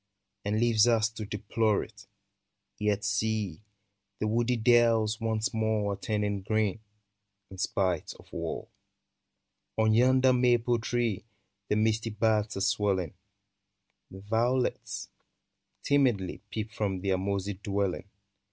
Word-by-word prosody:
And 105 Hz, +2 st, 0 dB
leaves 115 Hz, -1 st, +4 dB
us 110 Hz, -2 st, +3 dB
to 110 Hz, -1 st, -7 dB
deplore 105 Hz, +1 st, 0 dB
it, 105 Hz, -2 st, -14 dB, 0.4 s
— 100 Hz, 0 st, -54 dB
Yet 105 Hz, 0 st, +1 dB
see! 105 Hz, -4 st, -1 dB, 0.6 s
the -, -, -2 dB
woody 120 Hz, +3 st, +1 dB
dells 115 Hz, -1 st, +3 dB
once 110 Hz, -1 st, -1 dB
more 110 Hz, -2 st, 0 dB
Are -, -, -3 dB
turning 105 Hz, -1 st, -2 dB
green, 110 Hz, +1 st, 0 dB, 0.7 s
in 95 Hz, -, -10 dB
spite 90 Hz, -2 st, 0 dB
of -, -, -19 dB
war. -, -, -4 dB, 1.1 s
On 110 Hz, 0 st, +3 dB
yonder 130 Hz, +2 st, +5 dB
maple 120 Hz, -1 st, +3 dB
tree 115 Hz, -3 st, -1 dB, 0.4 s
The -, -, +1 dB
misty 110 Hz, +1 st, +1 dB
buds 110 Hz, -1 st, 0 dB
are -, -, -2 dB
swelling; 100 Hz, -5 st, +1 dB, 1.0 s
Violets, 115 Hz, +6 st, -1 dB, 0.7 s
timidly. 125 Hz, -10 st, +1 dB
Peep 110 Hz, 0 st, -4 dB
from 100 Hz, -4 st, -2 dB
their 95 Hz, -1 st, 0 dB
mossy 100 Hz, +1 st, -2 dB
dwelling. 100 Hz, -1 st, -2 dB
110 Hz, 120 wpm, -29 LUFS, 100-115 Hz, 1.1 s, yonder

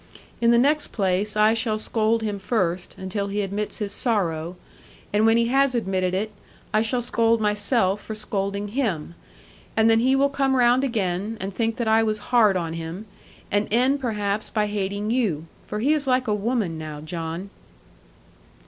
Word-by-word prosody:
In 235 Hz, -, +4 dB
the 235 Hz, -, +5 dB
next 295 Hz, +5 st, +3 dB
place 200 Hz, +1 st, 0 dB
I 215 Hz, +1 st, +5 dB
shall 225 Hz, -1 st, 0 dB
scold 220 Hz, +1 st, 0 dB
him 205 Hz, -2 st, -2 dB
first, 185 Hz, -4 st, -1 dB
until 195 Hz, +2 st, -3 dB
he 205 Hz, +1 st, -1 dB
admits 200 Hz, +2 st, -3 dB
his 205 Hz, -2 st, -3 dB
sorrow; 175 Hz, -7 st, -1 dB, 0.6 s
and 215 Hz, +2 st, +4 dB
when 225 Hz, +1 st, +5 dB
he 235 Hz, -, +3 dB
has 270 Hz, 0 st, +3 dB
admitted 185 Hz, -5 st, 0 dB
it, 215 Hz, +3 st, -2 dB, 0.4 s
I 215 Hz, -, +4 dB
shall 240 Hz, +2 st, 0 dB
scold 230 Hz, -1 st, +2 dB
myself 210 Hz, -1 st, +1 dB
for 220 Hz, -, -6 dB
scolding 200 Hz, -1 st, -3 dB
him. 200 Hz, -, -2 dB, 0.6 s
And 225 Hz, 0 st, +5 dB
then 225 Hz, -, +4 dB
he 260 Hz, +3 st, +3 dB
will 280 Hz, +1 st, +3 dB
come 270 Hz, -1 st, +1 dB
round 245 Hz, +1 st, +4 dB
again, 210 Hz, -3 st, -1 dB
and 195 Hz, +1 st, -4 dB
think 225 Hz, +2 st, -1 dB
that 235 Hz, -, -2 dB
I 220 Hz, +1 st, +4 dB
was 215 Hz, -1 st, 0 dB, 0.2 s
hard 215 Hz, -6 st, +5 dB
on 165 Hz, -2 st, -3 dB
him; 165 Hz, +5 st, -6 dB, 0.5 s
and 205 Hz, +1 st, +1 dB
end 255 Hz, +5 st, +3 dB
perhaps 210 Hz, -3 st, -2 dB
by 215 Hz, -2 st, 0 dB
hating 205 Hz, +1 st, -2 dB
you 200 Hz, -11 st, 0 dB, 0.2 s
for 210 Hz, -, -4 dB
he 285 Hz, +6 st, +3 dB
is 295 Hz, -3 st, -1 dB
like 255 Hz, -1 st, +2 dB
a 210 Hz, -, +2 dB
woman 210 Hz, -6 st, -1 dB
now, 155 Hz, -1 st, -6 dB
John.' 165 Hz, +4 st, -5 dB
215 Hz, 180 wpm, -24 LUFS, 195-235 Hz, 0.6 s, the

